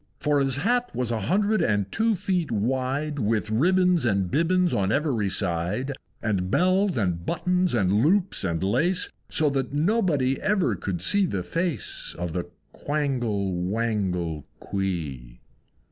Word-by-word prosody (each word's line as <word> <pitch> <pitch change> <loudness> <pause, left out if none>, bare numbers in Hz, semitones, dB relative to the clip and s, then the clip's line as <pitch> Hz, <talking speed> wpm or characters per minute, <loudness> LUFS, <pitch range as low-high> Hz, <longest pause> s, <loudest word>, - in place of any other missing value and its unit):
For 150 -1 +2
his 135 -2 +1
Hat 245 - +1
was 125 -1 -1
a 115 - -1
hundred 200 - +1
and 105 - 0
two 225 -1 +1
feet 185 -5 -1
wide, 130 +7 -1
With 110 -1 0
ribbons 180 +7 +3
and 100 -6 0
bibbons 175 +3 +2
on 95 0 +1
every 125 -8 0
side, 90 +11 -1 0.3
And 95 -5 0
bells, 185 - +2
and 90 -6 -1
buttons, 180 - 0
and 100 0 +2
loops, 185 - +2
and 85 -2 -1
lace, 175 - +1 0.2
So 150 -2 +2
that 135 -1 -2
nobody 150 - +1
ever 190 - +1
could 90 -1 -4
see 200 - +3
the 95 - -3
face 170 - -1
Of 85 -2 -4
the 90 0 -2 0.3
Quangle 120 -10 -1
Wangle 90 -5 -2
Quee. 75 -12 -4
125 Hz, 145 wpm, -25 LUFS, -, 0.3 s, ribbons